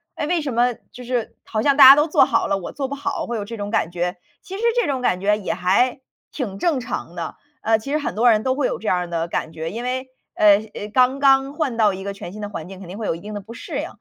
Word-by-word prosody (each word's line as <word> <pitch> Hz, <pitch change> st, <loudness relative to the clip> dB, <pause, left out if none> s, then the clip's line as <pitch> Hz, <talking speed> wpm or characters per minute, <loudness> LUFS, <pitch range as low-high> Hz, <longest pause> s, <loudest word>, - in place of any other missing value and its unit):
诶， 295 Hz, -, -3 dB
为 345 Hz, 0 st, +1 dB
什 275 Hz, -5 st, -3 dB
么 240 Hz, +1 st, +2 dB, 0.2 s
就 250 Hz, -, -10 dB
是 245 Hz, -2 st, -3 dB
好 215 Hz, -, -2 dB
像 280 Hz, -1 st, +4 dB
大 270 Hz, -2 st, +10 dB
家 275 Hz, -, +11 dB
都 295 Hz, +2 st, +2 dB
做 300 Hz, -, +5 dB
好 -, -, +1 dB
了， -, -, +1 dB
我 175 Hz, -, -7 dB
做 275 Hz, -1 st, -3 dB
不 280 Hz, -, -6 dB
好， 285 Hz, 0 st, -3 dB
会 240 Hz, -, -4 dB
有 210 Hz, -, -3 dB
这 230 Hz, +3 st, -7 dB
种 205 Hz, -1 st, -4 dB
感 170 Hz, -, 0 dB
觉。 175 Hz, +1 st, -2 dB, 0.3 s
其 380 Hz, -, -8 dB
实 -, -, -6 dB, 0.2 s
这 480 Hz, -, +1 dB
种 265 Hz, -3 st, -1 dB
感 185 Hz, -7 st, +1 dB
觉 210 Hz, +2 st, +2 dB
也 205 Hz, -, -3 dB
还 220 Hz, +9 st, +1 dB, 0.3 s
挺 215 Hz, -9 st, -4 dB
正 320 Hz, -6 st, +1 dB
常 185 Hz, -7 st, -5 dB
的， 165 Hz, -2 st, -5 dB, 0.3 s
呃， 220 Hz, 0 st, +3 dB
其 275 Hz, +6 st, -7 dB
实 300 Hz, -, +2 dB
很 295 Hz, -, -3 dB
多 240 Hz, +3 st, +4 dB
人 215 Hz, 0 st, +2 dB
都 260 Hz, 0 st, +1 dB
会 275 Hz, -2 st, 0 dB
有 -, -, -4 dB
这 220 Hz, -, -7 dB
样 180 Hz, -, +3 dB
儿 180 Hz, -, -4 dB
的 165 Hz, -1 st, -2 dB
感 160 Hz, -1 st, -3 dB
觉， 160 Hz, 0 st, -5 dB
因 230 Hz, +4 st, -5 dB
为， 255 Hz, +1 st, -3 dB, 0.3 s
呃， 205 Hz, -1 st, +6 dB, 0.2 s
呃， 210 Hz, -, -6 dB
刚 255 Hz, +1 st, +3 dB
刚 270 Hz, 0 st, +4 dB
换 295 Hz, -6 st, -2 dB
到 210 Hz, -3 st, +4 dB
一 190 Hz, -, -7 dB
个 200 Hz, -, -3 dB
全 195 Hz, -3 st, -8 dB
新 215 Hz, -, -8 dB
的 205 Hz, -, -3 dB
环 165 Hz, -5 st, -7 dB
境， 190 Hz, -1 st, -10 dB
肯 190 Hz, -, -10 dB
定 190 Hz, -, -7 dB
会 220 Hz, -, -4 dB
有 165 Hz, -, 0 dB
一 -, -, -9 dB
定 210 Hz, +1 st, -8 dB
的 205 Hz, -, -4 dB
不 220 Hz, +4 st, -11 dB
适 275 Hz, +5 st, -6 dB
应。 310 Hz, -, -3 dB
230 Hz, 325 characters per minute, -21 LUFS, 195-270 Hz, 0.3 s, 家